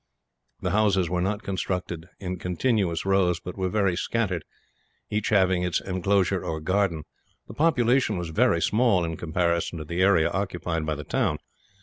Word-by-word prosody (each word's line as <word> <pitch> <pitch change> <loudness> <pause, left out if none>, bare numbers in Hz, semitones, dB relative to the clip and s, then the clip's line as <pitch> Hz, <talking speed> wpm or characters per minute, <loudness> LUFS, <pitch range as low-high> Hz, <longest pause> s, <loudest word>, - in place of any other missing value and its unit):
The 90 - 0
houses 95 -4 +2
were 90 -1 0
not 100 +3 -1
constructed 90 -3 -3
in 90 -2 -4
continuous 90 -2 0
rows, 95 -3 +2
but 90 +1 -8
were 95 -1 -1
very 95 -2 +1
scattered, 90 -3 -1 0.7
each 105 0 -1
house 110 - +4
having 95 -2 +2
its 90 -1 0
inclosure 95 0 0
or 80 -1 -3
garden. 90 -1 0 0.4
The - - -9
population 125 - +2
was 85 -2 -4
very 100 -1 +2
small, 105 -2 +3
in 80 0 -3
comparison 85 +1 -1
to 80 - -6
the 85 +4 -2
area 95 -4 +4
occupied 85 -4 -2
by 80 - 0
the 75 - -6
town. - - 0
90 Hz, 165 wpm, -26 LUFS, 85-100 Hz, 0.7 s, house